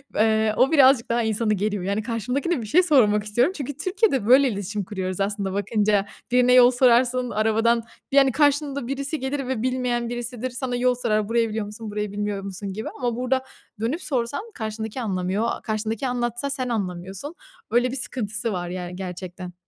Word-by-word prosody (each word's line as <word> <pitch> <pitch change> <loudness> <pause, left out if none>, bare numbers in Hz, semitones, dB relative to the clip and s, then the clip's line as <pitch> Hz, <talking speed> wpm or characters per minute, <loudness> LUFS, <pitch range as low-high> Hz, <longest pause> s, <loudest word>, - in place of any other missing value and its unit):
eee, 220 0 +3
o 265 - +4
birazcık 270 -5 +5
daha 235 +1 +2
insanı 220 0 +1
geriyor. 205 -1 -1
Yani, 200 +3 -1
karşımdakine 250 - -1
bir - - -6
şey 360 - +4
sormak 220 - +4
istiyorum 240 - +1
çünkü 280 -1 -5
Türkiye'de 370 - +1
böyle 265 +3 +7
iletişim 205 0 -3
kuruyoruz 185 -1 -4
aslında, 200 -1 -1
bakınca. 205 0 +1 0.3
Birine 250 0 +4
yol 250 0 +8
sorarsın, 250 0 +3
arabadan, 225 +2 +2 0.3
yani, 275 -1 +5
karşında 285 -2 +1
birisi 280 +3 -3
gelir 270 0 -3
ve 255 -4 -2
bilmeyen 250 -2 -1
birisidir. 240 +1 -4
Sana 250 0 -3
yol 250 0 +2
sorar. 215 -4 0
Burayı 230 -1 +2
biliyor 215 0 -3
musun, 210 +1 -8
burayı 210 -1 -3
bilmiyor 205 -1 -3
musun 195 0 -6
gibi 220 +2 -5
ama 245 -2 -1
burada 255 +2 0 0.4
dönüp 250 +11 -1
sorsan 280 - -2
karşındaki 220 +2 -5
anlamıyor. 195 +1 -1 0.2
Karşındaki 220 +2 -2
anlatsa 240 +2 -2
sen 260 -3 -2
anlamıyorsun. 195 - -4 0.4
Öyle 245 +2 +2
bir - - -4
sıkıntısı 225 -4 -3
var, 175 -1 -3
yani, 180 0 -5
gerçekten. 180 -1 -7
230 Hz, 170 wpm, -24 LUFS, 210-255 Hz, 0.4 s, yol